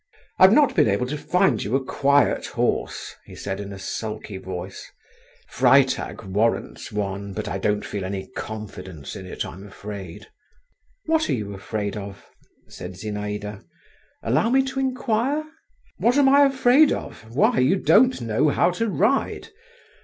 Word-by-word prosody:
"I've 190 +1 +8
not 285 +5 +4
been - - +4
able 100 +4 +1
to 140 +4 -3
find 150 - +1
you 105 +6 -1
a 135 -1 0
quiet 140 +1 +2
horse," - - -2
he - - -13
said 95 -1 -4
in 100 -1 -6
a 100 - -7
sulky 105 +1 -5
voice; 95 0 -7 0.6
"Freitag - - +3
warrants 105 +4 -1
one, 100 -1 -3
but 105 +1 -4
I 95 - -3
don't 105 +1 0
feel 100 -2 -4
any 95 0 -4
confidence 95 -8 -7
in 95 - -8
it, - - -4
I - - -8
am 95 +2 -11
afraid." 100 -1 -8 0.8
"What 320 0 +1
are - - +2
you 105 -3 -5
afraid 100 +1 -4
of?" 100 -1 -8 0.4
said 90 +1 -8
Zinaïda; 105 +1 -5 0.6
"allow 130 - +2
me 265 +2 +4
to 265 0 -4
inquire?" 260 +2 0 0.5
"What 245 +4 +2
am 280 -2 +5
I 280 +1 +7
afraid 270 +2 +4
of? - - -5
Why, 135 - +3
you 130 +9 +4
don't 250 +6 +4
know 115 +5 +1
how 175 - +2
to 225 +5 -1
ride. 215 +8 0
110 Hz, 160 wpm, -23 LUFS, -, 0.8 s, I've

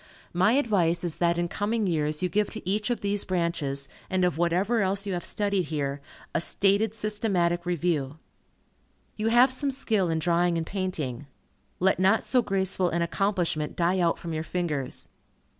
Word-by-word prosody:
My 185 +6 +3
advice 190 - +2
is 170 -3 -3
that 170 -1 +2
in 175 0 0
coming 210 +4 -1
years 155 -2 0
you - - +3
give 205 +4 0
to 220 -5 -8
each 210 +3 0
of 240 - -1
these 205 0 0
branches, 170 -6 -2 0.2
and 185 -1 +2
of 180 - +1
whatever 180 +7 +1
else 195 +1 0
you 195 - -2
have 175 - -3
studied 200 -3 0
here, 140 -2 -2 0.3
a 170 - +1
stated 200 +4 +1
systematic 195 -5 0
review. 160 -5 -1 1.0
You 215 +1 -1
have 240 +3 +5
some 280 +2 +1
skill 220 -9 0
in 165 - 0
drawing 170 +1 +2
and 165 - -2
painting. 160 - -4 0.5
Let 190 +1 +2
not 195 +4 +3
so 255 - +2
graceful 190 -3 +1
an 170 0 0
accomplishment 170 -4 -1
die 180 +2 +1
out 170 -2 +2
from 165 -1 -6
your 155 - -2
fingers. 160 -5 -3
180 Hz, 175 wpm, -27 LUFS, 170-205 Hz, 1.0 s, have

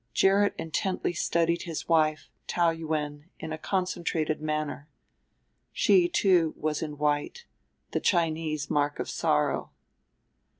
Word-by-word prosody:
Gerrit 200 +1 +4
intently 175 +3 -2
studied 170 +1 +1
his 165 -3 -5
wife, 155 -2 +2 0.2
Taou 170 -1 +2
Yuen, 155 -1 -4
in 160 0 -5
a - - -4
concentrated 170 -4 -1
manner. 155 -1 -3 0.8
She, 355 -2 +4
too, 185 - +3
was 155 -1 -2
in 150 -2 -5
white, 150 - -1 0.5
the - - 0
Chinese 160 -4 0
mark 145 0 0
of - - -3
sorrow. - - 0
160 Hz, 120 wpm, -28 LUFS, 155-175 Hz, 0.8 s, Gerrit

